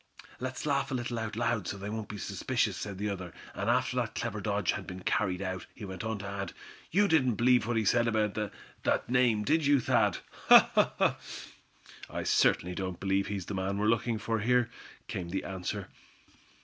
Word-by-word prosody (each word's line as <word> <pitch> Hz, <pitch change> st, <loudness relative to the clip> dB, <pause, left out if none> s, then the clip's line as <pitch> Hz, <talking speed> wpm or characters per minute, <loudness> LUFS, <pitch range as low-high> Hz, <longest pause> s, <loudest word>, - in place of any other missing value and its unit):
"Let's 130 Hz, +2 st, -4 dB
laugh 140 Hz, -2 st, +1 dB
a 135 Hz, -, -2 dB
little, 120 Hz, -1 st, -2 dB
out 105 Hz, -2 st, -4 dB
loud, 115 Hz, -5 st, 0 dB
so 100 Hz, -, -3 dB
they 100 Hz, +1 st, -6 dB
won't 110 Hz, -1 st, -4 dB
be 105 Hz, -, -6 dB
suspicious," -, -, -1 dB
said 100 Hz, -2 st, -5 dB
the 105 Hz, +2 st, -2 dB
other; 90 Hz, -4 st, -4 dB, 0.2 s
and -, -, -2 dB
after -, -, +1 dB
that -, -, -1 dB
clever -, -, -3 dB
dodge -, -, +1 dB
had -, -, -5 dB
been 90 Hz, 0 st, -7 dB
carried 95 Hz, -1 st, 0 dB
out, 95 Hz, -2 st, -4 dB
he 110 Hz, -, -7 dB
went 95 Hz, -2 st, -6 dB
on 110 Hz, -1 st, -2 dB
to 100 Hz, 0 st, -6 dB
add: 100 Hz, -2 st, -4 dB, 0.4 s
"you 205 Hz, +4 st, +4 dB
didn't 130 Hz, -, +3 dB
believe 120 Hz, +1 st, +4 dB
what 120 Hz, -1 st, 0 dB
he 110 Hz, -, +1 dB
said 120 Hz, +4 st, +3 dB
about 110 Hz, -2 st, +1 dB, 0.5 s
that -, -, +1 dB
name, 120 Hz, -4 st, +3 dB
did 155 Hz, +6 st, +2 dB
you, 145 Hz, -1 st, +5 dB
Thad?" -, -, +2 dB, 1.9 s
"I -, -, -4 dB
certainly 90 Hz, +1 st, +3 dB
don't 95 Hz, -1 st, -4 dB
believe 95 Hz, 0 st, +1 dB
he's 100 Hz, -3 st, -3 dB
the 105 Hz, -, -5 dB
man 95 Hz, +1 st, -1 dB
we're 105 Hz, -, 0 dB
looking 115 Hz, +1 st, +2 dB
for 115 Hz, +2 st, -1 dB
up -, -, -3 dB
here," 125 Hz, -1 st, +3 dB, 0.4 s
came 90 Hz, -2 st, -4 dB
the 95 Hz, +2 st, -2 dB
answer. 95 Hz, -2 st, -4 dB
105 Hz, 200 wpm, -30 LUFS, 95-120 Hz, 1.9 s, you